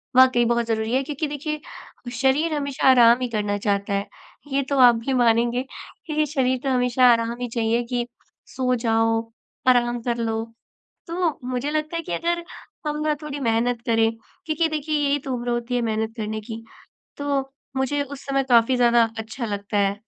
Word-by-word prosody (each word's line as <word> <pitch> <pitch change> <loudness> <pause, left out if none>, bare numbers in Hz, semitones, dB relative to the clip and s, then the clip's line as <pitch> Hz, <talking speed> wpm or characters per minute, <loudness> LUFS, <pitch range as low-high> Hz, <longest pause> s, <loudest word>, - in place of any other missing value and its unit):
वाक़ई 255 -2 +6
बहुत 235 0 +1
ज़रूरी 220 +1 -1
है 265 - +3
क्योंकि 295 +2 -3
देखिए 300 +1 -4 0.6
शरीर 295 +5 +2
हमेशा 280 -2 -1
आराम 240 -1 +6
ही 250 - 0
करना 205 -2 -1
चाहता 200 0 -1
है। 200 +1 -1 0.5
ये 275 - +2
तो 280 - 0
आप 245 -2 +8
भी 270 - 0
मानेंगे 240 +1 +2 0.4
क्योंकि 305 -1 0
शरीर 260 -3 +1
तो 275 - 0
हमेशा 250 0 +2
आराम 230 0 +1
ही 245 - -1
चाहिए 230 +1 +1
कि 240 -1 0 0.5
सो 255 -1 +1
जाओ 225 -1 +1 0.5
आराम 240 -1 +3
कर 235 0 -2
लो। 225 -1 -1 0.6
तो 335 -2 -1
मुझे 255 +3 -2
लगता 310 +2 -2
है 335 - -2
कि 175 - -6
अगर 340 - -1 0.4
हम 300 0 -2
ना 305 - +2
थोड़ी 290 -1 -5
मेहनत 235 0 0
करें 225 -1 +3 0.4
क्योंकि 320 +1 +1
देखिए 305 0 -1
यही 285 +1 +2
तो 265 -2 -4
उम्र 240 0 -3
होती 240 +1 -1
है 240 - 0
मेहनत 220 0 -2
करने 215 0 -3
की 225 0 -6 0.5
तो 285 -1 0 0.4
मुझे 285 +2 0
उस 280 0 -10
समय 275 -1 +1
काफ़ी 235 +1 +5
ज़्यादा 235 -2 +4
अच्छा 225 +2 -5
लगता 205 0 -3
है। 200 0 +2
245 Hz, 180 wpm, -23 LUFS, 230-280 Hz, 0.6 s, आप